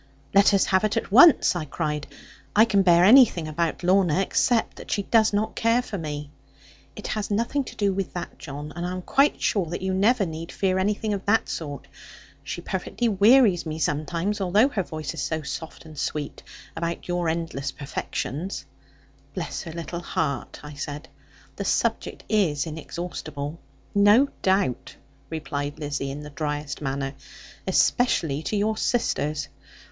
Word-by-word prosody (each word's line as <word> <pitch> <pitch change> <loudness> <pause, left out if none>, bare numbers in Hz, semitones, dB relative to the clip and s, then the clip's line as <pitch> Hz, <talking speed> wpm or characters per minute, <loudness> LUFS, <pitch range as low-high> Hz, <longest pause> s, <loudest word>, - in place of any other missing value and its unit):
'Let 200 +1 +6
us 195 - +3
have 190 0 +2
it 215 +2 +1
at 225 - -2
once,' 270 - +7
I 165 -3 -2
cried; 150 0 -3 0.5
'I 215 +2 +7
can 205 -3 +3
bear 175 -2 +5
anything 210 -7 +6
about 165 +2 -2
Lorna, 185 -2 +3
except 225 +4 +1
that - - -10
she 200 - 0
does 220 +1 +3
not 215 +2 -1
care 230 +2 +2
for 205 -5 -5
me.' 150 -2 -5 0.6
'It - - -9
has 215 -2 -2
nothing 235 +7 0
to - - -9
do 200 -2 +1
with 195 -1 -3
that, 175 - -6
John. 145 +1 -7
And 175 - -4
I 180 +1 -2
am 185 0 -5
quite 275 +8 +3
sure 195 -6 +1
that 175 +3 -5
you 190 0 0
never 205 +3 +3
need 165 0 -6
fear 190 -1 0
anything 210 +2 0
of 200 -1 -3
that 225 +2 +2
sort. 145 -4 -5 0.6
She - - -5
perfectly 240 -1 -2
wearies 205 -3 +5
me 155 0 -4
sometimes, 170 +7 -1
although 205 +8 +4
her 220 -8 -1
voice 155 -5 -5
is - - -5
so 160 +2 -2
soft 160 +4 -7
and 155 -1 -12
sweet, 145 +1 -4 0.3
about 170 0 -3
your 175 -2 0
endless 160 -4 -3
perfections.' 150 +4 -4 0.7
'Bless - - -4
her 165 - -7
little 170 +1 -5
heart!' 140 -6 -3
I 150 0 -8
said; 145 +2 -6 0.5
'the - - -3
subject - - -1
is 175 -10 +1
inexhaustible.' 155 -1 -6 0.3
'No 205 +7 +5
doubt,' 190 -10 0 0.3
replied 145 -2 -4
Lizzie, 145 -2 -3
in 140 +2 -6
the 150 - -9
driest 150 -1 -4
manner; 135 -1 -2 0.5
'especially 160 - +2
to 210 - -3
your 215 +2 +1
sisters. 155 - 0
175 Hz, 165 wpm, -25 LUFS, 150-205 Hz, 0.7 s, once